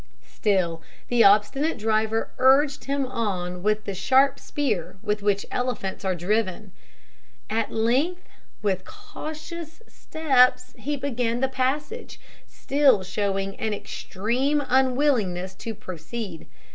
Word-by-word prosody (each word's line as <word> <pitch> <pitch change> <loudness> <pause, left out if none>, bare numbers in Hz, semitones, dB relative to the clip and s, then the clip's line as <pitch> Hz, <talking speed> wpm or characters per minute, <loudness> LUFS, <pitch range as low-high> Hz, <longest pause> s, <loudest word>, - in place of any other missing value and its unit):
Still, 180 -6 0 0.3
the 240 -1 +5
obstinate 215 +10 +4
driver 220 0 0
urged 270 0 +4
him 275 0 0
on 185 -8 -3
with 215 +2 +1
the 200 - -3
sharp 265 +8 +3
spear 220 - -2
with 210 -1 -1
which 200 -1 +1
elephants 245 -7 -2
are 190 -1 0
driven. 195 +2 -1 0.8
At 225 0 0
length, 265 +11 0 0.4
with 190 -3 0
cautious 335 - -8
steps 270 -6 +2
he 290 +1 -3
began 245 -4 -1
the 265 - +2
passage, 285 - -2 0.3
still 270 -8 +3
showing 195 0 -2
an 220 -4 -1
extreme 250 +10 -1
unwillingness 250 -8 +2
to 225 -1 -5
proceed. 185 +1 -7
230 Hz, 115 wpm, -25 LUFS, 200-275 Hz, 0.8 s, the